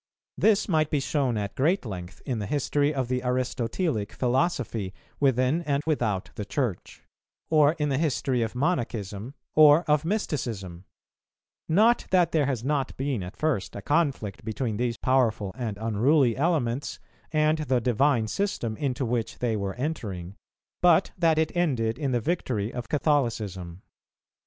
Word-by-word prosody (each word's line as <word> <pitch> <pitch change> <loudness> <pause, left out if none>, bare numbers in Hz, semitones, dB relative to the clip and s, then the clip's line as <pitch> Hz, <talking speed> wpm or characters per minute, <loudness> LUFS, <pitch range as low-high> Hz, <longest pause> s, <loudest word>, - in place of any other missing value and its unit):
This 215 -2 +3
might 155 -5 +2
be 145 - +1
shown 135 -4 0
at 100 -1 -3
great 165 +5 +1
length 90 -5 -7
in 125 -5 -2
the 105 - -4
history 145 0 +1
of 135 -4 -2
the 125 0 -1
Aristotelic 125 - -1
philosophy 120 - -1 0.2
within 135 +3 +2
and 145 -3 -1
without 115 -11 -1
the 105 - -5
Church; 110 - -3 0.5
or 150 -1 +5
in 150 -3 -1
the 135 0 0
history 135 -5 0
of 115 +1 -2
Monachism, 120 - -2 0.2
or 155 +1 +7
of 150 -2 +2
Mysticism; 115 - -3 0.8
not 220 +8 +4
that 175 -3 +3
there 150 -4 +2
has 125 -5 -2
not 140 -1 -1
been 135 -5 -1
at 90 +2 -8
first 150 -12 -1
a 100 - -5
conflict 140 - 0
between 110 0 -3
these 120 0 -1
powerful 115 -6 +1
and 115 -5 -4
unruly 115 +4 +2
elements 140 -4 0 0.3
and 155 0 +2
the 135 -5 +1
Divine 120 0 +2
System 120 - -2
into 135 -1 -1
which 115 -1 -2
they 120 -3 0
were 100 -2 -3
entering, 105 - -4 0.5
but 175 +1 +4
that 165 -3 +2
it 160 +1 0
ended 125 -10 0
in 140 -3 -1
the 120 - +2
victory 120 - -2
of 120 -2 -6
Catholicism. 110 - -1
130 Hz, 150 wpm, -26 LUFS, 110-150 Hz, 0.8 s, or